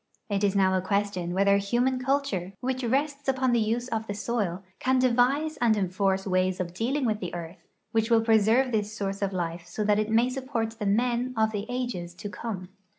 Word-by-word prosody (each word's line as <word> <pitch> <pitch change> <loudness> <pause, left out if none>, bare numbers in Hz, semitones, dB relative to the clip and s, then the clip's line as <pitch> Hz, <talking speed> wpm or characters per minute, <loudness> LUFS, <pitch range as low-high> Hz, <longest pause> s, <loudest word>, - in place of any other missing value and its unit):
It 200 0 0
is 200 -1 +2
now 190 -1 +3
a 185 - +1
question 200 -2 -1
whether 200 +2 +4
human 245 +6 +1
culture, 265 -9 -1
which 260 0 -2
rests 280 +4 -1
upon 260 -1 +2
the 240 - +3
use 230 +3 0
of 220 -2 -2
the 205 - -3
soil, 205 -5 -2 0.2
can 260 0 +2
devise 255 +5 +2
and 230 -3 +3
enforce 190 0 0
wa}'S 185 -1 +1
of 175 -2 -3
dealing 255 +8 -1
with 215 -2 0
the 180 -3 -5
earth 170 0 -8 0.2
which 225 0 +1
will 230 -1 +5
preserve 225 +3 +4
this 210 -2 0
source 195 0 -3
of 200 -1 0
life 170 -2 -3
so 185 +4 -3
that 210 0 +3
it 215 0 0
may 225 +2 +4
siq)j)ort 250 -4 -3
the 210 - -1
men 240 +4 +1
of 220 0 +3
the 205 -1 -4
ages 240 -9 -3
to 205 +3 -6
come. 200 -4 -6
215 Hz, 210 wpm, -27 LUFS, 195-245 Hz, 0.2 s, will